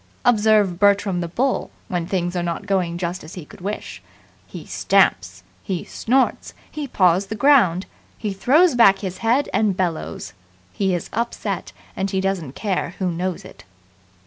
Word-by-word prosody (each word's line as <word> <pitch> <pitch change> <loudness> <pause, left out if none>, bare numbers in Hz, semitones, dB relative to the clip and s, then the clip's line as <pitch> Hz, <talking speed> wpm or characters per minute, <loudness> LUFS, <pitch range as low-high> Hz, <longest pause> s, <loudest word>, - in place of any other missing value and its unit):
Observe 210 -6 +3
Bertram 200 -2 +3
the 170 - -3
Bull 255 +10 -1 0.2
when 175 -2 -2
things 175 -1 -2
are 175 - 0
not 170 +3 -3
going 185 -4 0
just 175 0 -4
as 155 - -10
he 175 -5 -8
could - - -15
wish. 205 +3 -5 0.5
He - - -9
stamps. - - +1 0.2
He 185 -4 -3
snorts. 260 +3 0 0.2
He 300 -2 -5
paws 185 -3 +2
the 220 - -4
ground. 215 -10 +4 0.3
He 210 -3 -3
throws 290 - +4
back 200 -5 +6
his 185 -1 -5
head 240 +5 +2
and 205 -4 +1
bellows. 175 -4 -3 0.4
He 190 -2 0
is 175 - -6
upset, 235 +2 -3 0.2
and 195 +1 -2
he 190 - -1
doesn't 190 -8 -2
care 190 -3 -2
who 185 -2 -1
knows 180 +1 -3
it. - - -13
195 Hz, 165 wpm, -21 LUFS, 175-220 Hz, 0.5 s, back